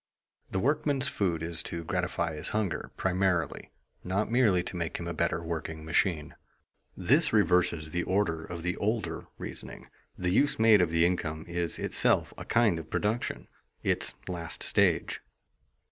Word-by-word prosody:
The -, -, -2 dB
workman's 145 Hz, +4 st, +2 dB
food 85 Hz, -, -1 dB
is 85 Hz, -1 st, +2 dB
to 85 Hz, 0 st, -4 dB
gratify 90 Hz, -1 st, -1 dB
his 75 Hz, -, -4 dB
hunger, 105 Hz, -4 st, -2 dB
primarily; 90 Hz, -4 st, 0 dB, 0.3 s
not 100 Hz, +4 st, -1 dB
merely 110 Hz, -8 st, +4 dB
to 90 Hz, -, -6 dB
make 85 Hz, -2 st, -2 dB
him 85 Hz, -, -5 dB
a 85 Hz, -, -2 dB
better 85 Hz, +1 st, 0 dB
working 80 Hz, -1 st, -4 dB
machine. 80 Hz, -1 st, +1 dB, 0.6 s
This 140 Hz, -, +3 dB
reverses 90 Hz, -6 st, +2 dB
the 85 Hz, -, 0 dB
order 85 Hz, -4 st, 0 dB
of 85 Hz, 0 st, -7 dB
the 90 Hz, 0 st, -1 dB
older 100 Hz, -6 st, -2 dB
reasoning. -, -, -8 dB, 0.3 s
The 90 Hz, -1 st, 0 dB
use 145 Hz, +9 st, +3 dB
made 110 Hz, -3 st, +6 dB
of 90 Hz, -, +2 dB
the 85 Hz, +1 st, +3 dB
income 80 Hz, -3 st, -1 dB
is 85 Hz, -1 st, -2 dB
itself -, -, +1 dB
a -, -, -8 dB
kind 115 Hz, -8 st, +3 dB
of 80 Hz, -, -10 dB
production 110 Hz, +3 st, -1 dB, 0.4 s
its -, -, -1 dB
last 85 Hz, -2 st, -5 dB
stage. -, -, +2 dB
90 Hz, 155 wpm, -29 LUFS, 85-105 Hz, 0.6 s, made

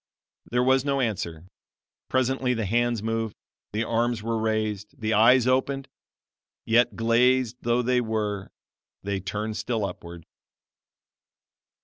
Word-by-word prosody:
There 125 Hz, +1 st, +2 dB
was 130 Hz, +1 st, +3 dB
no 140 Hz, -1 st, 0 dB
answer. 90 Hz, -9 st, -2 dB, 0.6 s
Presently 130 Hz, 0 st, +1 dB
the 115 Hz, -2 st, -2 dB
hands 120 Hz, +1 st, +1 dB
moved, 115 Hz, -1 st, -2 dB, 0.4 s
the 110 Hz, +2 st, -1 dB
arms 115 Hz, -1 st, 0 dB
were 115 Hz, 0 st, -1 dB
raised, 110 Hz, -2 st, -2 dB
the 110 Hz, 0 st, 0 dB
eyes 115 Hz, +4 st, +6 dB
opened 135 Hz, +1 st, +1 dB, 0.8 s
yet, 115 Hz, +2 st, +3 dB
glazed 120 Hz, +1 st, +2 dB
though 120 Hz, +1 st, +1 dB
they 125 Hz, 0 st, +2 dB
were 105 Hz, -3 st, -2 dB, 0.5 s
they 100 Hz, -1 st, -2 dB
turned 105 Hz, +3 st, -4 dB
still 110 Hz, 0 st, -1 dB
upward. 85 Hz, -3 st, -8 dB
115 Hz, 120 wpm, -26 LUFS, 105-125 Hz, 0.8 s, eyes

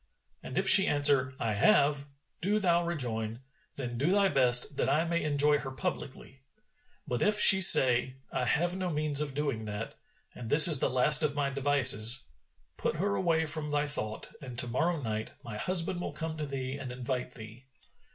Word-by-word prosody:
And -, -, -10 dB
if -, -, -2 dB
she 195 Hz, 0 st, +7 dB
answer, 140 Hz, -3 st, +1 dB
'I 110 Hz, -2 st, -3 dB
have,' 140 Hz, -, 0 dB, 0.4 s
do 200 Hz, +5 st, -2 dB
thou 175 Hz, -4 st, -1 dB
rejoin, 120 Hz, -8 st, -6 dB, 0.3 s
'Then 120 Hz, -3 st, -7 dB
do 150 Hz, +7 st, -1 dB
thy 200 Hz, 0 st, +1 dB
best 125 Hz, 0 st, +3 dB
that -, -, -2 dB
I 155 Hz, +4 st, -1 dB
may 170 Hz, 0 st, -4 dB
enjoy 145 Hz, 0 st, 0 dB
her 135 Hz, -, -8 dB
publicly.' 135 Hz, -3 st, -9 dB, 0.7 s
But, 125 Hz, -, -5 dB
if 210 Hz, 0 st, 0 dB
she 190 Hz, -2 st, +7 dB
say, 130 Hz, -6 st, +6 dB, 0.2 s
'I 125 Hz, -, -3 dB
have 170 Hz, +9 st, -2 dB
no 185 Hz, -1 st, -5 dB
means 150 Hz, -2 st, -2 dB
of 140 Hz, -3 st, -6 dB
doing 140 Hz, -7 st, -5 dB
that, 105 Hz, +1 st, -8 dB, 0.4 s
and 115 Hz, -2 st, -11 dB
this 150 Hz, +4 st, +8 dB
is 155 Hz, -5 st, +5 dB
the -, -, -2 dB
last 130 Hz, +5 st, +3 dB
of 150 Hz, -2 st, -2 dB
my 140 Hz, -1 st, -3 dB
devices,' 135 Hz, -3 st, +3 dB, 0.5 s
put -, -, -4 dB
her 200 Hz, +5 st, -3 dB
away 165 Hz, -4 st, -2 dB
from 150 Hz, 0 st, -3 dB
thy 145 Hz, 0 st, -2 dB
thought, 110 Hz, -7 st, -6 dB
and 125 Hz, -4 st, -11 dB
to 125 Hz, -, +3 dB
morrow 160 Hz, +8 st, -3 dB
night 110 Hz, -4 st, -7 dB
my 110 Hz, -2 st, -9 dB
husband 175 Hz, -, -4 dB
will -, -, -7 dB
come 160 Hz, -1 st, -7 dB
to 150 Hz, -1 st, -6 dB
thee 135 Hz, 0 st, -7 dB
and 130 Hz, -2 st, -9 dB
invite 125 Hz, 0 st, -7 dB
thee. 115 Hz, +3 st, -14 dB
140 Hz, 190 wpm, -27 LUFS, 125-160 Hz, 0.7 s, this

